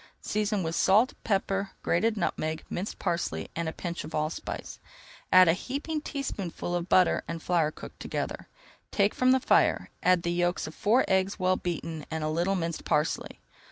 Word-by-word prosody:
Season 210 -2 -1
with 165 0 -2
salt, 210 +8 +4
pepper, 195 -1 0
grated 220 +5 +1
nutmeg, 160 -3 -2
minced 190 +4 -3
parsley, 80 - -2
and 170 -1 -1
a - - -4
pinch 170 +1 -5
of 155 +2 -7
allspice. 155 +1 -4 0.5
Add 185 -1 +8
a 165 - +6
heaping 285 - -3
teaspoonful 205 - -4
of 175 0 -2
butter 185 -1 +4
and 170 0 -4
flour 165 -2 +1
cooked - - -11
together. - - -4 0.4
Take 200 0 +2
from 255 - +2
the 260 - +5
fire, 260 - +2
add 180 -1 +3
the 170 - 0
yolks 175 +1 0
of 155 - -7
four 235 +9 +3
eggs 190 +1 +1
well 185 0 +2
beaten 165 -3 -4
and 160 -1 -3
a 155 - 0
little 175 +5 +1
minced 165 -2 -3
parsley. 150 0 -1
180 Hz, 175 wpm, -28 LUFS, 165-200 Hz, 0.5 s, Add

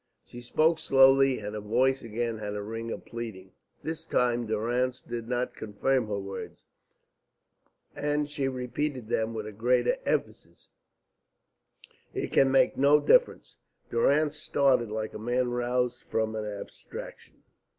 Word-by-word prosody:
She 120 - -10
spoke 155 +7 +2
slowly, 135 0 +5
and 105 0 -6
her 105 - -4
voice 130 +6 +2
again 115 0 -3
had 105 -1 -4
a 105 - -4
ring 115 +2 -5
of - - -6
pleading. 110 -6 -7 0.3
This 160 +1 -5
time 120 -1 +1
Durrance 120 +4 0
did 120 -1 -6
not 125 0 -1
confirm 110 +4 0
her 105 -1 -2
words, 100 -1 -7 1.3
and 150 0 0
she 145 -2 -2
repeated 130 -1 -3
them 110 -1 0
with 110 -1 -4
a 105 - -6
greater 120 +3 +2
emphasis, - - -3 1.5
"It - - -3
can 135 - +5
make 135 0 +3
no 140 +2 +5
difference." - - +2 0.3
Durrance 145 +5 +2
started 135 -6 +2
like 110 0 -4
a - - -7
man 120 +2 0
roused 125 0 -1
from 110 0 -2
an 110 -1 -3
abstraction. 105 -1 -9
120 Hz, 140 wpm, -28 LUFS, 110-135 Hz, 1.5 s, slowly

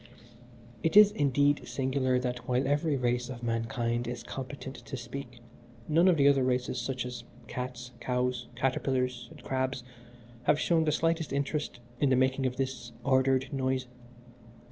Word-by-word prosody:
"It 165 - +2
is 210 -1 +9
indeed 145 - +2
singular 130 -1 0
that 125 -1 -3
while 125 +2 +1
every 145 +1 +1
race 125 0 0
of 120 -2 -7
mankind 115 +1 -1
is 120 -1 -5
competent 135 0 -7
to 135 - -7
speak, 120 -1 -8 0.5
none 165 +4 +4
of 180 -3 +5
the 140 -1 +5
other 140 -2 +5
races, 125 -1 0
such 125 0 -3
as 125 -1 -6 0.2
cats, 125 -1 -5
cows, 125 -1 -1
caterpillars, 125 -1 0
and - - -14
crabs, 130 -1 -1 0.6
have 150 - +4
shown 165 -2 +2
the 155 - +2
slightest 165 0 0
interest 140 -1 -2 0.2
in 140 - +3
the 130 - +4
making 130 +1 +2
of 125 - -4
this 130 -3 -3
ordered 130 0 +2
noise. 130 -1 0
130 Hz, 155 wpm, -30 LUFS, 125-140 Hz, 0.6 s, is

